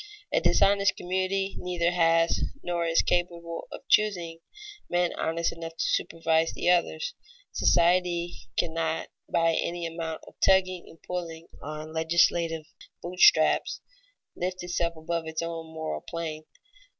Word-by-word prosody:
A - - +3
dishonest 200 0 +4
community 190 +2 -1
neither 175 -1 0
has, 165 -1 +3 0.2
nor 170 -1 -1
is 165 0 +3
capable 170 -1 -2
of - - -10
choosing, 175 -6 +2 0.5
men 175 0 +1
honest 165 +1 -1
enough 165 0 -7
to - - 0
supervise 165 0 +1
the 175 - +2
others. 485 - 0 0.4
Society 175 0 +2 0.2
cannot, 160 -1 -1 0.2
by 165 -1 +3
any 170 +1 -2
amount 165 -1 -5
of - - -13
tugging 185 -2 +3
and 165 - -16
pulling 170 -2 -5
on 155 +1 -7
legislative 165 0 +2 0.4
boot 180 +1 -6
straps, 155 -3 +5 0.5
lift 185 0 -3
itself 170 -1 -1
above 165 +1 -3
its 160 +1 -3
own 165 -1 -5
moral 160 - -4
plane. 160 -2 -5
170 Hz, 130 wpm, -27 LUFS, 165-180 Hz, 0.5 s, straps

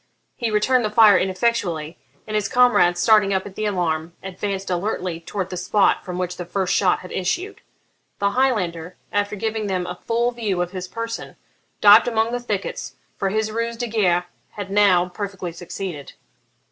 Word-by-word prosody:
He 235 -3 -2
returned 240 +4 +2
the 215 - 0
fire 215 -2 +7
ineffectually, 185 -5 -1 0.3
and 215 - -7
his 210 -2 0
comrades, 245 -8 +4
starting 210 -3 +4
up 190 - -1
at 200 - -9
the 215 - -3
alarm, 170 -4 -1
advanced 195 0 -4
alertly 180 -2 -2
towards 185 +2 -5
the 180 - -4
spot 195 +3 +2
from 180 -1 -6
which 180 0 -3
the 180 - -4
first 185 +1 -1
shot 185 -3 +2
had 180 - -11
issued. 350 - -2 0.6
The 200 0 +1
Highlander, 185 -9 0 0.2
after 205 +1 0
giving 220 0 -2
them 185 -2 -1
a 180 0 -6
full 235 +1 +1
view 215 -6 -2
of 175 0 -1
his 185 -1 -5
person, 230 +2 -6 0.5
dived 205 +3 +8
among 225 -1 +1
the 245 - -1
thickets, 210 -5 -4 0.2
for 195 - -1
his 215 +2 -1
ruse 230 +1 -2
de 240 - -2
guerre 185 -6 +1 0.3
had 200 -2 -6
now 195 -3 +4
perfectly 190 -1 -5
succeeded. 170 -2 -7
200 Hz, 175 wpm, -22 LUFS, 180-220 Hz, 0.6 s, dived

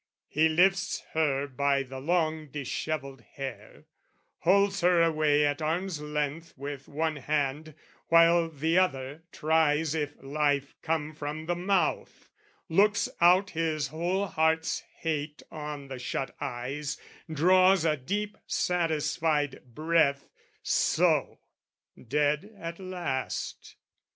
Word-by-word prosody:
He 160 +2 +3
lifts 190 +4 +2
her 145 -3 +1
by 140 0 +1
the 130 0 -8
long 160 0 0
dishevelled 140 -1 -4
hair, 135 -1 -8 0.5
Holds 200 +2 +3
her 175 -1 +4
away 155 -2 +3
at 145 +2 -1
arms' 165 +1 -1
length 150 +2 -3
with 140 0 -6
one 155 +1 -1
hand, 150 +2 -2 0.3
While 165 0 +5
the 160 +3 +1
other 140 -4 -1
tries 155 -1 +2
if 150 -2 -2
life 140 0 0
come 155 -1 -1
from 150 +1 -5
the 175 - 0
mouth 185 +1 -1 0.4
Looks 205 +5 +3
out 180 +3 +5
his 155 -3 -1
whole 175 +6 -1
heart's 160 -2 +1 0.2
hate 150 -2 -3
on 150 -2 -6
the 130 -1 -7
shut 135 +2 -4
eyes, 140 +4 -4 0.3
Draws 185 +3 +4
a 155 -2 +3
deep 205 +10 -4
satisfied 155 -3 0
breath, 155 -3 +2 0.4
"So - - +2 0.7
dead 150 - +1
at 170 -1 -6
last!" 175 -8 -4
155 Hz, 115 wpm, -28 LUFS, 145-170 Hz, 0.7 s, While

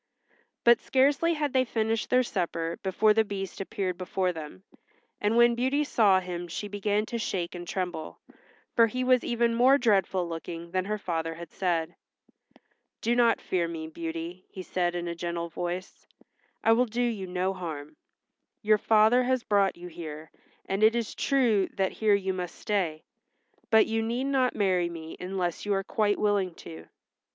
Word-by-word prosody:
But 235 0 +6
scarcely 285 +5 +2
had 295 -3 -2
they 260 -1 +4
finished 225 -2 -1
their 255 0 +4
supper 170 -6 -3
before 210 +3 +3
the 220 +1 +3
Beast 195 -2 -5
appeared 190 -2 -3
before 185 0 -1
them, 150 - -9 0.6
and 210 +3 +1
when 235 0 +6
Beauty 260 +5 +1
saw 210 -9 +4
him 175 -1 -5
she 205 +5 -5
began 205 +1 -1
to 235 +1 -4
shake 180 -5 -2
and 175 -1 -7
tremble, 180 -4 -4 0.6
for 230 -1 +6
he 255 +3 -2
was 255 -1 +3
even 235 -1 +1
more 255 +4 +5
dreadful 195 -7 +2
looking 170 0 -7
than 185 0 0
her 210 +1 -2
father 165 -4 -3
had 170 -1 -10
said. 170 -4 -1 1.1
"Do 235 +2 +1
not 235 -1 +4
fear 175 -2 -1
me, 160 -1 -6
Beauty," 165 +2 -6
he 185 - -8
said 175 -1 -1
in 175 0 -3
a 170 - -2
gentle 170 0 -4
voice. 175 +2 -5 0.6
"I 225 - +4
will 245 +2 +4
do 235 +2 -1
you 220 -6 -2
no 185 +1 -1
harm. 155 -5 -7 0.7
Your 215 0 +4
father 220 +4 +4
has 255 -1 +1
brought 200 -3 +2
you 175 +1 -9
here, 160 -2 -8 0.3
and 195 +2 -2
it 220 +2 +5
is 235 -2 -2
true 240 -8 +2
that 190 -1 0
here 215 -2 +2
you 190 -1 -1
must 180 -2 -5
stay, 175 -7 -2 0.7
but 220 -1 +6
you 225 0 -1
need 235 +3 -1
not 270 -2 +1
marry 185 -4 +1
me 160 -1 -8
unless 180 -2 -3
you 205 -1 0
are 195 - -1
quite 205 +1 +1
willing 200 -4 +1
to." 80 0 -11
195 Hz, 175 wpm, -28 LUFS, 175-225 Hz, 1.1 s, But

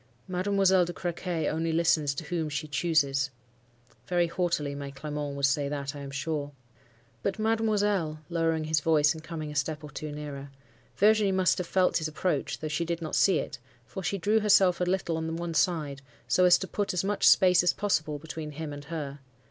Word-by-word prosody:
"'Mademoiselle 190 0 +3
de 175 - -5
Crequy 175 -2 -3
only 165 +1 -1
listens 160 -3 +2
to 150 - -5
whom 165 -1 -2
she 150 +2 -3
chooses.' 140 -3 +1 0.8
Very 175 -1 +2
haughtily 170 -4 -1
my 140 0 -6
Clement 145 0 -5
would 140 -1 +1
say 140 0 +1
that, 140 0 -4
I - - -7
am 140 -1 -7
sure. 145 +1 -3 0.7
"'But, 195 - -1
mademoiselle,'—lowering 185 -8 0
his 155 0 +1
voice, 150 -1 +3
and 160 -1 -10
coming 160 -3 -6
a - - -9
step 150 +1 -2
or 150 - -9
two 150 +2 -6
nearer. 145 -2 -7 0.5
Virginie 210 -1 +4
must 185 -7 +2
have 180 - -3
felt 185 0 +2
his 155 - -2
approach, 170 +4 -2
though 155 - -2
she 155 +2 -1
did 170 0 -2
not 160 -2 -6
see 195 - +4
it; - - -4 0.3
for 190 - -7
she 200 +2 -1
drew 210 +5 +2
herself 195 -4 +4
a - - +2
little 175 -2 -1
on 160 0 -3
one 170 0 -4
side, 150 -3 0 0.3
so 180 - +4
as 180 - +7
to 190 - -5
put 200 0 -2
as 180 - +1
much 205 +1 +2
space 180 -3 +6
as 180 - +3
possible 155 -7 -1
between 155 0 -7
him 150 0 -5
and 145 0 -9
her. 145 -3 -5
160 Hz, 195 wpm, -28 LUFS, 150-180 Hz, 0.8 s, as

